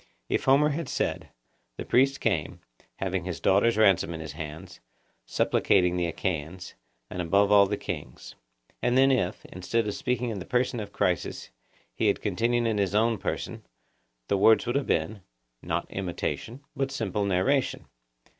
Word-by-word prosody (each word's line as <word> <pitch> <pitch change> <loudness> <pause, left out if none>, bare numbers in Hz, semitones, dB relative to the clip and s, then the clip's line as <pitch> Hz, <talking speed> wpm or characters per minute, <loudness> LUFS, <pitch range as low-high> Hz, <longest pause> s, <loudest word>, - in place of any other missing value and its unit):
If - - 0
Homer 140 +3 +5
had 155 -1 -3
said, - - -2 0.5
'The - - -5
priest 135 +2 +3
came, - - -1 0.4
having 95 -2 -2
his 90 -1 -5
daughter's 105 +4 +3
ransom 95 -5 +3
in - - -7
his 80 -1 -6
hands, 80 +4 -8 0.5
supplicating 90 -2 +2
the 90 -1 0
Achaeans, 85 +1 -4 0.4
and 90 - -3
above 100 +4 +2
all 100 -1 +7
the 105 +1 -2
kings;' - - -7 0.5
and 125 +1 +2
then 135 +1 +5
if, 120 -9 -1
instead 105 +5 -2
of 105 - -2
speaking 125 +1 -2
in 105 - -4
the 90 - -7
person 125 -1 0
of 105 -2 -6
Chryses, - - -2 0.4
he - - 0
had - - +2
continued 120 +1 0
in 110 -2 0
his 100 0 0
own 110 0 +2
person, - - -4 0.6
the 100 - +1
words 110 +4 +5
would 120 +2 -2
have 140 -1 0
been, 100 +6 -1 0.4
not - - -2
imitation, 95 +7 -4
but 135 -1 -1
simple 105 -6 -2
narration. 100 +8 +1
100 Hz, 165 wpm, -27 LUFS, 90-120 Hz, 0.6 s, all